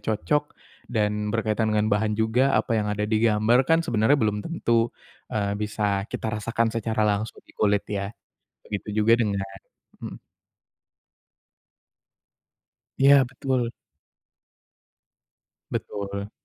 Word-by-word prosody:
cocok 145 Hz, +7 st, -1 dB, 0.3 s
dan 105 Hz, -2 st, 0 dB
berkaitan 110 Hz, 0 st, 0 dB
dengan 105 Hz, 0 st, +2 dB
bahan 105 Hz, +1 st, +1 dB
juga. 115 Hz, +5 st, +2 dB
Apa -, -, 0 dB
yang 105 Hz, -, -2 dB
ada 105 Hz, 0 st, -1 dB
di 110 Hz, +1 st, +1 dB
gambar 110 Hz, +1 st, +3 dB
kan, 165 Hz, 0 st, +5 dB
sebenernya 115 Hz, -1 st, +3 dB
belum 105 Hz, -5 st, 0 dB
tentu, 165 Hz, -8 st, -2 dB, 0.6 s
eee, 100 Hz, -2 st, -1 dB
bisa 105 Hz, -1 st, -1 dB
kita -, -, -4 dB
rasakan 115 Hz, +1 st, 0 dB
secara 110 Hz, -1 st, 0 dB
langsung 105 Hz, +1 st, -2 dB
di -, -, -20 dB
kulit, 105 Hz, -1 st, +1 dB
ya. 100 Hz, -1 st, -3 dB, 0.5 s
Begitu 105 Hz, 0 st, -6 dB
juga 115 Hz, +2 st, +4 dB
dengan 100 Hz, -4 st, 0 dB, 0.6 s
mhm. -, -, -7 dB, 2.8 s
Iya, 140 Hz, 0 st, +6 dB
betul. 130 Hz, -2 st, -2 dB, 2.0 s
Betul. 100 Hz, 0 st, -4 dB
110 Hz, 115 wpm, -25 LUFS, 105-115 Hz, 2.8 s, Iya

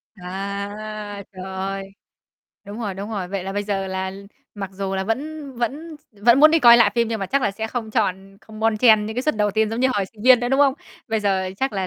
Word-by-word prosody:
À, 200 Hz, +2 st, -6 dB
trời 185 Hz, -1 st, -8 dB
ơi. 190 Hz, +1 st, -4 dB, 0.8 s
Đúng 205 Hz, +3 st, -8 dB
rồi, 205 Hz, -4 st, -3 dB
đúng 200 Hz, +3 st, -6 dB
rồi. 195 Hz, -5 st, -4 dB
Vậy 195 Hz, -1 st, -4 dB
là 195 Hz, -, -4 dB
bây 205 Hz, +1 st, -1 dB
giờ 195 Hz, -2 st, -2 dB
là 190 Hz, 0 st, -3 dB, 0.4 s
mặc 195 Hz, -2 st, -5 dB
dù 195 Hz, 0 st, -3 dB
là 190 Hz, 0 st, -1 dB
vẫn 285 Hz, +7 st, -4 dB
vẫn 295 Hz, +7 st, -4 dB
s -, -, -32 dB, 0.2 s
vẫn 235 Hz, +5 st, +5 dB
muốn 310 Hz, +1 st, +8 dB
đi 330 Hz, -, +4 dB
coi 235 Hz, -5 st, +8 dB
lại 235 Hz, -, +5 dB
phim 235 Hz, -1 st, +1 dB
nhưng 225 Hz, -2 st, -3 dB
mà 195 Hz, -, -2 dB
chắc 275 Hz, +6 st, 0 dB
là 205 Hz, -, +2 dB
sẽ 220 Hz, +3 st, -4 dB
không 225 Hz, -1 st, -5 dB
chọn 195 Hz, -4 st, -1 dB
ừ, 195 Hz, -, -20 dB
không 215 Hz, 0 st, -12 dB
bon 225 Hz, 0 st, +2 dB
chen 215 Hz, -2 st, +5 dB
những 220 Hz, +1 st, -6 dB
cái 250 Hz, -, 0 dB
suất 305 Hz, -5 st, 0 dB
đầu 210 Hz, -1 st, +1 dB
tiên 220 Hz, +1 st, +1 dB
giống 225 Hz, +2 st, -3 dB
như 260 Hz, -, +4 dB
hồi 200 Hz, -, +1 dB
sinh 210 Hz, -2 st, -14 dB
viên 250 Hz, 0 st, +7 dB
nữa, 245 Hz, -, -1 dB
đúng 270 Hz, +2 st, +2 dB
không? 275 Hz, -2 st, +4 dB, 0.3 s
Bây 220 Hz, -1 st, 0 dB
giờ 190 Hz, -2 st, 0 dB
chắc 265 Hz, +5 st, -1 dB
là 190 Hz, -2 st, -2 dB
215 Hz, 265 wpm, -22 LUFS, 195-240 Hz, 0.8 s, muốn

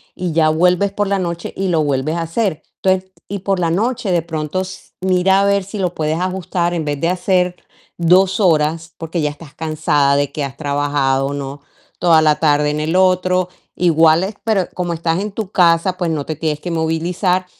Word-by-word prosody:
y 180 Hz, -3 st, -3 dB
ya 155 Hz, -1 st, +3 dB
vuelves 180 Hz, +5 st, +2 dB
por 205 Hz, 0 st, -1 dB
la 200 Hz, -1 st, 0 dB
noche 170 Hz, -1 st, -4 dB
y 195 Hz, 0 st, -2 dB
lo 165 Hz, -3 st, +2 dB
vuelves 145 Hz, +3 st, -1 dB
a 165 Hz, -, -1 dB
hacer. 165 Hz, 0 st, -2 dB, 0.2 s
Entonces, 190 Hz, 0 st, +1 dB, 0.2 s
y 200 Hz, -1 st, -3 dB
por 195 Hz, 0 st, -1 dB
la 170 Hz, -2 st, +1 dB
noche, 225 Hz, +2 st, -1 dB
de 170 Hz, -2 st, +2 dB
pronto, 160 Hz, +2 st, -3 dB
s 185 Hz, 0 st, -9 dB
mira 190 Hz, +1 st, +3 dB
a -, -, +2 dB
ver 200 Hz, -1 st, +2 dB
si 200 Hz, +3 st, -8 dB
lo 180 Hz, -2 st, -1 dB
puedes 155 Hz, +1 st, -1 dB
ajustar 180 Hz, -1 st, -1 dB
en 165 Hz, -2 st, -1 dB
vez 145 Hz, -1 st, -2 dB
de 165 Hz, -, +1 dB
hacer 180 Hz, 0 st, +1 dB, 0.4 s
2 185 Hz, +4 st, +3 dB
horas, 165 Hz, -2 st, +1 dB
porque 165 Hz, 0 st, -3 dB
ya 150 Hz, -, +1 dB
estás 150 Hz, -1 st, -13 dB
cansada 150 Hz, -3 st, +1 dB
de 145 Hz, -1 st, 0 dB
que 150 Hz, -, -3 dB
has 135 Hz, -, -8 dB
trabajado, 140 Hz, -2 st, 0 dB
¿no? 140 Hz, 0 st, -6 dB, 0.4 s
Toda 165 Hz, -3 st, +5 dB
la 155 Hz, -1 st, +4 dB
tarde 150 Hz, -1 st, +3 dB
en 150 Hz, +1 st, -2 dB
el 160 Hz, +3 st, -1 dB
otro. 185 Hz, -1 st, +2 dB, 0.3 s
Igual 165 Hz, 0 st, +4 dB
es 200 Hz, +2 st, -4 dB
pero 210 Hz, -5 st, +1 dB
como 175 Hz, -1 st, -2 dB
estás 165 Hz, +1 st, -1 dB
en 205 Hz, +1 st, -3 dB
tu 210 Hz, -1 st, -5 dB
casa, 175 Hz, +1 st, +3 dB
pues, 175 Hz, -3 st, -1 dB
no 150 Hz, -3 st, -2 dB
te 155 Hz, -, -4 dB
tienes 155 Hz, -2 st, -2 dB
que 175 Hz, -, -4 dB
movilizar. 175 Hz, +3 st, 0 dB
170 Hz, 210 wpm, -18 LUFS, 155-185 Hz, 0.4 s, Toda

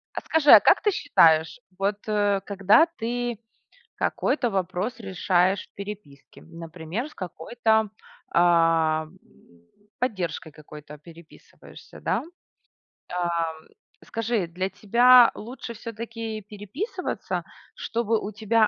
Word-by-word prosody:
А -, -, -2 dB
скажи, 315 Hz, -2 st, +2 dB
а -, -, +11 dB
как -, -, +4 dB
ты 415 Hz, -, +3 dB
считаешь, 165 Hz, -, +3 dB, 0.2 s
вот, 200 Hz, +1 st, 0 dB
э, 205 Hz, -2 st, +1 dB
когда 200 Hz, -, +4 dB
ты 240 Hz, 0 st, -3 dB, 0.6 s
какой-то 245 Hz, -5 st, 0 dB
вопрос 190 Hz, +5 st, -3 dB
решаешь 185 Hz, -1 st, 0 dB
в -, -, -46 dB
переписке, 200 Hz, -9 st, -10 dB
например, 165 Hz, -, -7 dB
с -, -, -18 dB
какой-то, 220 Hz, +5 st, -1 dB, 0.4 s
а, 165 Hz, -2 st, +3 dB
м 185 Hz, +4 st, -19 dB, 0.8 s
поддержкой 185 Hz, -9 st, -3 dB
какой-то 150 Hz, 0 st, -12 dB
переписываешься, 165 Hz, +1 st, -16 dB
да? -, -, -1 dB, 0.9 s
Ам, 170 Hz, -2 st, -3 dB, 0.4 s
скажи, 225 Hz, -5 st, -2 dB
для 185 Hz, +3 st, -3 dB
тебя 240 Hz, +5 st, +6 dB
лучше 235 Hz, +1 st, -8 dB
всё-таки 225 Hz, -1 st, -7 dB
переписываться, 235 Hz, -, -5 dB, 0.3 s
чтобы 230 Hz, -1 st, -1 dB
у 210 Hz, -, -6 dB
тебя 220 Hz, +1 st, +2 dB
200 Hz, 110 wpm, -25 LUFS, 170-230 Hz, 0.9 s, а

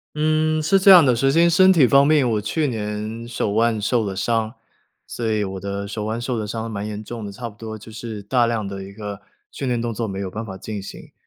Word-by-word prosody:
嗯， 155 Hz, +1 st, +1 dB
是 195 Hz, +5 st, +3 dB
这 195 Hz, -, +5 dB
样 180 Hz, -5 st, +9 dB
的。 125 Hz, -3 st, +3 dB
首 135 Hz, +3 st, +2 dB
先 170 Hz, +4 st, +4 dB
身 185 Hz, +3 st, +6 dB
体 165 Hz, -8 st, +5 dB
方 140 Hz, +4 st, +5 dB
面， 150 Hz, -4 st, +4 dB
我 110 Hz, -3 st, 0 dB
去 150 Hz, +8 st, -1 dB
年 110 Hz, 0 st, -4 dB
手 120 Hz, -3 st, -2 dB
腕 115 Hz, 0 st, +2 dB
受 110 Hz, +2 st, +1 dB
了 95 Hz, -2 st, -4 dB
伤， 115 Hz, +3 st, -1 dB, 0.5 s
所 115 Hz, -2 st, -4 dB
以 105 Hz, -1 st, +1 dB
我 95 Hz, -1 st, -5 dB
的 100 Hz, +1 st, -4 dB
手 105 Hz, 0 st, -4 dB
腕 110 Hz, +2 st, -2 dB
受 120 Hz, -1 st, -2 dB
的 105 Hz, -, -4 dB
伤 115 Hz, +2 st, -4 dB
蛮 105 Hz, 0 st, -4 dB
严 105 Hz, 0 st, -6 dB
重 115 Hz, 0 st, -7 dB
的， 100 Hz, -, -6 dB
差 120 Hz, +4 st, -6 dB
不 105 Hz, -, -18 dB
多 110 Hz, 0 st, -7 dB
就 110 Hz, +1 st, -13 dB
是 110 Hz, -2 st, -7 dB
大 120 Hz, +3 st, +2 dB
量 110 Hz, -3 st, -2 dB
的 95 Hz, 0 st, -6 dB
一 100 Hz, +1 st, -10 dB
个 105 Hz, -1 st, -7 dB, 0.3 s
训 135 Hz, -, -5 dB
练 120 Hz, -2 st, 0 dB
动 120 Hz, -1 st, -2 dB
作 115 Hz, +1 st, -3 dB
没 95 Hz, -1 st, -5 dB
有 95 Hz, -1 st, -3 dB
办 110 Hz, +1 st, -5 dB
法 95 Hz, -2 st, -8 dB
进 105 Hz, 0 st, -6 dB
行。 -, -, -11 dB
110 Hz, 275 characters per minute, -21 LUFS, 105-125 Hz, 0.5 s, 样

